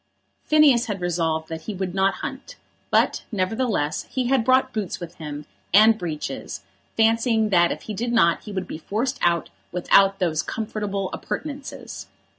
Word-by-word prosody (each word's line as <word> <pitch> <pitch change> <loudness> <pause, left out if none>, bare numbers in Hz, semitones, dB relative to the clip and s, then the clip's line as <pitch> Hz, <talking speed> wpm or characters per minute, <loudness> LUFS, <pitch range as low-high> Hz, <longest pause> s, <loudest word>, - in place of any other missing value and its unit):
Phineas 285 -6 +5
had 205 -3 -3
resolved 165 -3 -1
that 160 -1 -6
he 210 - -3
would 185 -1 -3
not 195 0 +2
hunt; - - -7 0.3
but, - - +2
nevertheless, 195 - -1
he 260 -1 -1
had 265 -3 +3
brought 260 +1 +3
boots 210 -6 -3
with 175 -1 -8
him, 150 -2 -7 0.3
and 220 +1 +7
breeches, 160 -5 -5 0.3
fancying 225 0 +3
that 175 -3 +4
if - - -5
he 215 - -5
did 235 +4 -2
not 170 -8 +3
he 210 - -7
would 190 -2 -4
be 155 - -6
forced 235 - -2
out 170 -1 +1 0.2
without 195 +2 +4
those 165 -5 0
comfortable 210 -3 -3
appurtenances. 285 -2 -6
200 Hz, 160 wpm, -23 LUFS, 175-230 Hz, 0.3 s, and